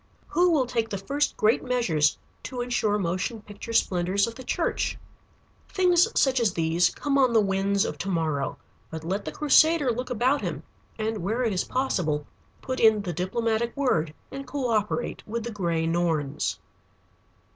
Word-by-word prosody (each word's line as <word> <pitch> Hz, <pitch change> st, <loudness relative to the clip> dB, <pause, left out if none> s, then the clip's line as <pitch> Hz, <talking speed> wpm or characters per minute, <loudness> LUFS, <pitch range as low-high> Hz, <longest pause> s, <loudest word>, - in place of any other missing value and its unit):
Who 355 Hz, +1 st, +3 dB
will 300 Hz, -6 st, +3 dB
take 235 Hz, -2 st, -1 dB
the 200 Hz, -, -3 dB
first 280 Hz, +10 st, -1 dB
great 215 Hz, +2 st, +3 dB
measures 180 Hz, -13 st, +1 dB, 0.3 s
to 250 Hz, -1 st, -4 dB
insure 235 Hz, -4 st, 0 dB
motion 190 Hz, +4 st, -2 dB
picture 205 Hz, +3 st, -9 dB
splendors 190 Hz, -2 st, +2 dB
in 230 Hz, -, -6 dB
the 260 Hz, -, -10 dB
church? -, -, -1 dB, 0.7 s
Things 360 Hz, -2 st, +4 dB
such 265 Hz, -2 st, +3 dB
as 225 Hz, -4 st, +1 dB
these 165 Hz, +1 st, +2 dB
come 280 Hz, -1 st, -1 dB
on 255 Hz, -3 st, +4 dB
the 225 Hz, -, +6 dB
winds 195 Hz, 0 st, +1 dB
of -, -, -5 dB
to 195 Hz, -, -3 dB
morrow. 155 Hz, -6 st, -1 dB, 0.3 s
But 160 Hz, -1 st, -7 dB
let 190 Hz, +5 st, -3 dB
the -, -, -4 dB
crusader 305 Hz, -1 st, +4 dB
look 250 Hz, +3 st, -4 dB
about 255 Hz, +4 st, +1 dB
him, -, -, -4 dB, 0.3 s
and 220 Hz, 0 st, -2 dB
where 220 Hz, +8 st, -1 dB
it 225 Hz, -4 st, +1 dB
is 185 Hz, -, -1 dB
possible, 175 Hz, -, -1 dB, 0.4 s
put 260 Hz, -1 st, -3 dB
in 220 Hz, -2 st, +5 dB
the 175 Hz, -3 st, -3 dB
diplomatic 225 Hz, -, -1 dB
word, 165 Hz, -, +1 dB, 0.2 s
and 275 Hz, 0 st, -7 dB
coöperate 240 Hz, -5 st, -1 dB
with 230 Hz, +1 st, -3 dB
the 235 Hz, -, -5 dB
Gray 170 Hz, -6 st, -1 dB
Norns. 165 Hz, -4 st, 0 dB
220 Hz, 170 wpm, -26 LUFS, 180-250 Hz, 0.7 s, the